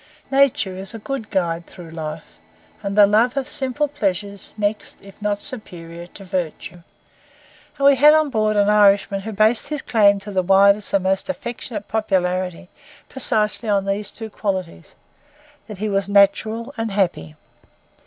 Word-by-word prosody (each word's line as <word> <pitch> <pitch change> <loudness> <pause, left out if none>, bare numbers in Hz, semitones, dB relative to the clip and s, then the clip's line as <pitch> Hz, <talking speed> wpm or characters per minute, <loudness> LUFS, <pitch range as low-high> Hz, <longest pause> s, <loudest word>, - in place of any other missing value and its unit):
Nature 270 -9 +2
is 195 +4 -7
a - - -4
good 225 0 -5
guide 170 -3 -1
through 170 -3 -12
life, 155 -1 -8 0.4
and 200 0 -4
the 205 - +9
love 225 +6 +2
of 265 -2 -1
simple 270 +2 -1
pleasures 200 -7 -3
next, 210 0 -3
if 195 +1 -15
not 205 0 0
superior, 175 -8 -7
to 195 - -12
virtue; 180 -1 -5 1.0
and 275 - 0
we 280 - +8
had 295 +4 +7
on 310 -2 +3
board 215 -2 +1
an 205 -1 +3
Irishman 200 -1 +4
who 220 +3 -6
based 215 +4 +2
his 300 -1 -4
claim 205 -3 +4
to 200 +1 -8
the 190 -2 +1
widest 200 +2 +4
and 195 -2 +2
most 190 +6 0
affectionate 240 -5 -5
popularity 185 -4 -1 0.4
precisely 220 -3 -1
upon 200 -1 +1
these 200 +1 -2
two 220 -2 -8
qualities, 185 - -4 0.7
that 210 - -8
he 215 +3 -3
was 195 -1 -1
natural 215 +5 +2
and 225 0 -1
happy. 180 - -1
205 Hz, 160 wpm, -21 LUFS, 190-225 Hz, 1.0 s, the